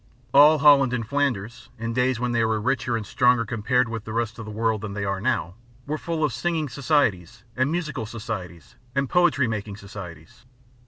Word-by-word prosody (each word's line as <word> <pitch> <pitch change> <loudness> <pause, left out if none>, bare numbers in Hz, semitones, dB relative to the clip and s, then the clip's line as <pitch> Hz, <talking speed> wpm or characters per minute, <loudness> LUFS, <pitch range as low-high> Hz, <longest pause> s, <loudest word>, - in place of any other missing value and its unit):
All 150 +3 +7
Holland 140 -3 +5
and 115 -3 -2
Flanders, 125 -4 -2
in 115 +1 -4
days 125 0 +1
when 125 0 -1
they 115 -1 +1
were 110 -1 +1
richer, 125 +1 0
and 110 - -5
stronger 125 +2 +3
compared 115 +4 +1
with 115 -1 -5
the 110 - -7
rest 115 -1 -2
of 115 - -6
the 110 - -7
world 110 -1 0
than 105 -2 -5
they 100 0 -3
are 95 -1 -2
now, 105 -7 -1 0.3
were 155 +2 -3
full 165 -2 -2
of 150 -5 +1
singing 155 +3 -1
societies 115 - 0
and 130 +3 +1
musical 155 -9 -3
societies 100 - -7 0.2
and 140 0 +1
poetry 175 -7 +3
making 105 -2 -4
societies. 95 -2 -11
115 Hz, 195 wpm, -24 LUFS, 105-140 Hz, 0.3 s, All